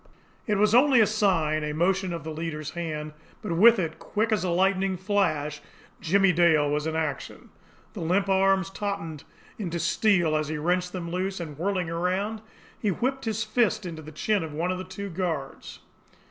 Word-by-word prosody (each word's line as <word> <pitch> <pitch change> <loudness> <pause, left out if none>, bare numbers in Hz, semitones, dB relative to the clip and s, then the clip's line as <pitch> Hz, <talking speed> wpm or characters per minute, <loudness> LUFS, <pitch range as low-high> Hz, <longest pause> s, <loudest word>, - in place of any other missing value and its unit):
It 210 - +2
was 210 +1 +3
only 260 +1 +6
a 220 - +7
sign, 180 -8 +1
a 150 0 -2
motion 185 +3 +1
of 170 - -5
the 160 - -5
leader's 155 -1 -5
hand 155 -3 -5 0.3
but 175 -6 -2
with 230 +6 +7
it, 165 -4 -3
quick 220 +2 -1
as 215 -3 +1
a 185 - -1
lightning 190 +1 +1
flash, 155 -7 0 0.4
Jimmie 195 +3 +3
Dale 165 -4 +4
was 150 +1 -1
in 160 - -2
action. 155 -4 -4 0.4
The - - -7
limp 185 +4 +1
arms 195 0 +2
tautened 180 -7 -4 0.3
into 175 -4 -3
steel 175 -1 +2
as 155 -1 0
he 155 +1 -3
wrenched 180 +3 0
them 170 -2 -5
loose, 190 +2 -2
and, 155 -4 -6
whirling 180 +1 -1
around, 190 +6 -1 0.4
he 210 - 0
whipped 265 +7 -1
his 220 0 -1
fist 215 -1 +1
to 180 - -5
the 155 -1 -9
chin 200 +5 0
of 155 -2 -6
one 170 +4 -1
of 185 - -3
the - - -4
two 190 +1 -7
guards. 165 -6 -4
180 Hz, 190 wpm, -26 LUFS, 160-200 Hz, 0.4 s, a